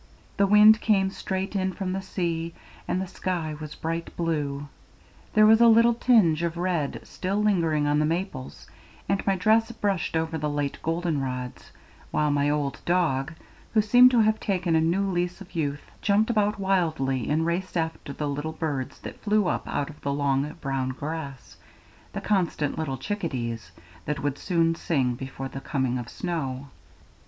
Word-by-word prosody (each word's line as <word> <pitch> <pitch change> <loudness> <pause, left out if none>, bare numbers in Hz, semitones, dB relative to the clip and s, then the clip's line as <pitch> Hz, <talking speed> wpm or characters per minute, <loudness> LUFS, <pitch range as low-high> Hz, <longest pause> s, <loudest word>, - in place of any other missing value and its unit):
The 200 - +4
wind 210 +2 +7
came 195 -3 +2
straight 190 +1 -4
in 190 -1 0
from 185 -1 -3
the 195 - -2
sea, 170 -3 -3 0.3
and 185 - 0
the 190 - -2
sky 175 -4 -3
was 150 -1 -7
bright 165 +1 -3
blue; 145 -4 -2 0.7
there 215 0 +7
was 220 +1 +6
a 235 - +8
little 230 +1 +6
tinge 215 -10 +4
of 170 0 -2
red 170 -5 -1
still 190 +1 -4
lingering 165 -8 +2
on 145 0 +2
the 150 - +2
maples, 165 -6 -4 0.4
and 200 0 0
my 195 - +3
dress 220 +5 +3
brushed 200 -7 -1
over 160 0 -2
the 150 0 -1
late 145 -1 -2
golden 165 -2 -1
rods, 125 -1 -5 0.4
while 150 -1 +1
my 145 0 +2
old 145 -2 -1
dog, 170 -4 +1 0.4
who 215 - +6
seemed 245 +4 +7
to 245 -2 +4
have 220 0 +2
taken 180 -5 0
a 160 - +4
new 170 +5 +1
lease 180 -1 -1
of 195 - -12
youth, 145 -3 -2 0.2
jumped 215 +3 +2
about 210 -2 +1
wildly 160 - 0
and 155 +2 +1
raced 175 +2 -2
after 160 -3 -3
the 150 +1 -3
little 145 +3 -3
birds 140 -4 -3
that - - -9
flew 210 -1 +2
up - - -2
out 145 +1 -2
of 150 - -18
the 140 - -2
long 140 0 0
brown 135 -2 -1
grass 140 0 -6 0.6
the - - -4
constant 175 -7 0
little 145 -4 -3
chickadees, 125 - -4 0.4
that 150 -1 -3
would 145 -1 -1
soon 165 -2 +2
sing 135 -7 0
before 135 +2 -6
the 135 +1 -8
coming 130 -4 -1
of 120 0 -7
snow. 140 -6 -4
165 Hz, 175 wpm, -26 LUFS, 145-190 Hz, 0.7 s, a